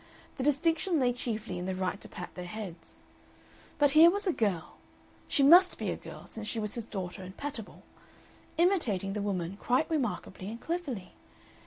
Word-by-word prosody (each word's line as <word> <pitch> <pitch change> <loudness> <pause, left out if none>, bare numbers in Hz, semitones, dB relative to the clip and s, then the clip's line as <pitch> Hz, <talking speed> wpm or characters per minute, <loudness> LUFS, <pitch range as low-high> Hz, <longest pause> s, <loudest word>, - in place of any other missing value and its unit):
The 260 - -2
distinction 325 +4 +2
lay 250 -2 +3
chiefly 220 -6 -3
in 180 - -4
the 190 - -2
right 185 +1 -2
to - - -9
pat 180 - -8
their 180 - -7
heads. 195 -3 -8 0.8
But 290 -1 +4
here 320 +3 +9
was 405 +3 +1
a 365 - +2
girl 195 - -1 0.5
she 280 - +2
must 355 +6 +8
be - - -2
a - - -2
girl, - - -10
since 220 -1 -4
she 230 - -2
was 210 -1 -1
his 230 -2 -4
daughter 190 -2 -5
and 185 +1 -10
pat 290 -3 -4
able 220 - -11 0.7
imitating 245 - +2
the 210 - -2
woman 190 -2 -2
quite 255 +8 +1
remarkably 230 -9 -2
and 230 +2 -7
cleverly. 270 - -4
225 Hz, 185 wpm, -30 LUFS, 190-300 Hz, 0.8 s, here